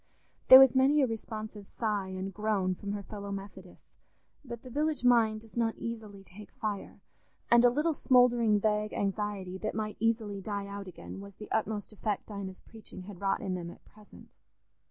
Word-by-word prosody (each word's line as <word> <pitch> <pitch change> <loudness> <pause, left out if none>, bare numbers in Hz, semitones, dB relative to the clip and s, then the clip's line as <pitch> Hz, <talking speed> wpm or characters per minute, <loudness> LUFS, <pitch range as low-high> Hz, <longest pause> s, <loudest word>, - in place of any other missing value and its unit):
There 260 - +12
was 265 -2 +7
many 275 +2 +4
a - - +5
responsive 215 -3 -6
sigh 210 -4 -2
and 190 +1 -5
groan 205 -3 0
from 200 +2 -5
her 205 -1 -4
fellow 200 0 -7
Methodists, 195 -2 -10 0.4
but 235 -4 -8
the 255 - -10
village 300 +1 -1
mind 225 -3 +4
does 225 -1 -16
not 230 -1 0
easily 215 -4 -7
take 195 +3 -13
fire, 215 -5 -5 0.5
and 235 0 +7
a 245 - +7
little 300 +6 +1
smouldering 240 -6 +4
vague 210 0 0
anxiety 195 -2 -3
that 215 - -3
might 215 -1 -3
easily 220 -3 0
die 200 0 -4
out 200 0 -7
again 185 +2 -9
was 200 -1 -11
the 210 - -11
utmost 215 -1 -2
effect 210 -1 -3
Dinah's 195 -2 -7
preaching 220 -4 -11
had 195 -1 -11
wrought 195 -1 0
in 190 - -2
them 175 -2 -4
at - - -14
present. 210 -1 -17
210 Hz, 180 wpm, -30 LUFS, 200-230 Hz, 0.5 s, There